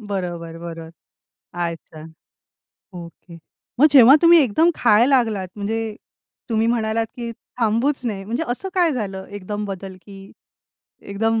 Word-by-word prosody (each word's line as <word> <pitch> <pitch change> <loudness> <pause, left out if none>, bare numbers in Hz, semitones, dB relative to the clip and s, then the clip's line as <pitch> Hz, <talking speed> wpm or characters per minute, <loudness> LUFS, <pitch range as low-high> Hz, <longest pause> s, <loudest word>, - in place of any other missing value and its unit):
बरोबर, 175 -4 -5
बरोबर. 165 -1 -9 0.6
अच्छा. 170 -2 -6 0.9
ओके. 170 0 -12 0.4
मग 305 - +7
जेव्हा 265 0 +8
तुम्ही 340 0 +7
एकदम 315 +9 +2
खायला 240 +4 +4
लागलात, 215 -7 -1
म्हणजे 220 +1 -3 0.5
तुम्ही 225 0 +1
म्हणालात 225 -1 0
की 235 -1 -5 0.3
थांबूच 240 +4 0
नये, 195 -3 -4
म्हणजे 235 +10 -3
असं 255 +11 -3
काय 350 -4 +2
झालं 195 -6 -4
एकदम 205 +1 -6
बदल 195 -1 -7
की 200 -1 -13 0.8
एकदम 225 +3 -1
215 Hz, 125 wpm, -21 LUFS, 190-240 Hz, 0.9 s, जेव्हा